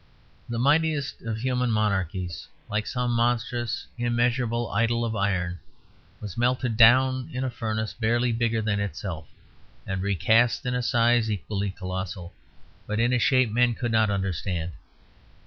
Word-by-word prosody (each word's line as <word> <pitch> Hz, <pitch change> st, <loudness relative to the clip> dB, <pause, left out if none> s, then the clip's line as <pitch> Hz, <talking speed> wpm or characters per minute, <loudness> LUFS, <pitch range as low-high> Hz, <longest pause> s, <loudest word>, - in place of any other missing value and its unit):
The 120 Hz, -, -3 dB
mightiest 145 Hz, +2 st, +1 dB
of 115 Hz, -1 st, -3 dB
human 125 Hz, +1 st, 0 dB
monarchies, 95 Hz, -5 st, -1 dB, 0.2 s
like 105 Hz, 0 st, -1 dB
some 125 Hz, -1 st, -1 dB
monstrous 120 Hz, 0 st, 0 dB
immeasurable 120 Hz, 0 st, 0 dB
idol 115 Hz, 0 st, +1 dB
of 110 Hz, -1 st, -2 dB
iron, 90 Hz, -3 st, -1 dB, 0.6 s
was 105 Hz, +1 st, -7 dB
melted 125 Hz, -1 st, +1 dB
down 130 Hz, +3 st, +5 dB
in 125 Hz, 0 st, -3 dB
a 130 Hz, -, -2 dB
furnace 110 Hz, -2 st, -3 dB
barely 120 Hz, +1 st, +1 dB
bigger 115 Hz, -1 st, 0 dB
than 105 Hz, -1 st, 0 dB
itself, 95 Hz, -6 st, -5 dB, 0.6 s
and 95 Hz, -1 st, -3 dB
recast 100 Hz, +7 st, +2 dB
in 125 Hz, -, -1 dB
a 125 Hz, -, 0 dB
size 120 Hz, -2 st, +2 dB
equally 100 Hz, 0 st, -2 dB
colossal, 95 Hz, -2 st, -5 dB, 0.5 s
but 105 Hz, +1 st, -2 dB
in 120 Hz, +2 st, +2 dB
a 125 Hz, -, +3 dB
shape 130 Hz, -2 st, +3 dB
men 120 Hz, +1 st, +2 dB
could 120 Hz, 0 st, -2 dB
not 110 Hz, -1 st, +3 dB
understand. 95 Hz, -3 st, -2 dB
115 Hz, 145 wpm, -26 LUFS, 100-120 Hz, 0.6 s, down